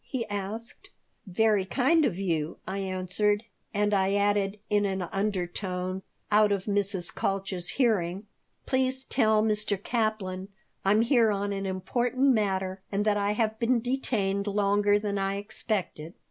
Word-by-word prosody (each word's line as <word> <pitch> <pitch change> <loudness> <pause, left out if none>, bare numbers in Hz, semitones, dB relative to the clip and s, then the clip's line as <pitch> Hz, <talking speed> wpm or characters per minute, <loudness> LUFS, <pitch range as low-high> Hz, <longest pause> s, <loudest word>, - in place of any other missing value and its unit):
he 250 -4 -3
asked 205 +3 -5 0.4
"Very 210 +1 +2
kind 275 - +3
of 175 - -1
you," 165 -5 -1
I 195 - -3
answered, 195 +3 0 0.3
and 210 0 +1
I 195 0 +2
added 205 0 +1
in 205 -1 +2
an 190 -1 -2
undertone, 185 -1 -2 0.3
out 210 0 +5
of 200 -2 0
Mrs. 200 -3 0
Kalch's 195 -2 -2
hearing, 200 -6 0 0.4
"Please 260 0 0
tell 220 -5 +2
Mr. 210 -2 +1
Kaplan 200 -3 -2 0.4
I'm 205 +3 +4
here 235 -2 +4
on 200 0 -1
an 195 0 -3
important 240 +8 0
matter 190 -3 -1
and 205 +1 0
that 210 -1 +3
I 205 0 +1
have 220 0 -1
been 240 +1 +2
detained 220 -5 -1
longer 205 0 +3
than 205 -1 -2
I 195 0 0
expected." 200 -5 -3
205 Hz, 145 wpm, -28 LUFS, 190-220 Hz, 0.4 s, out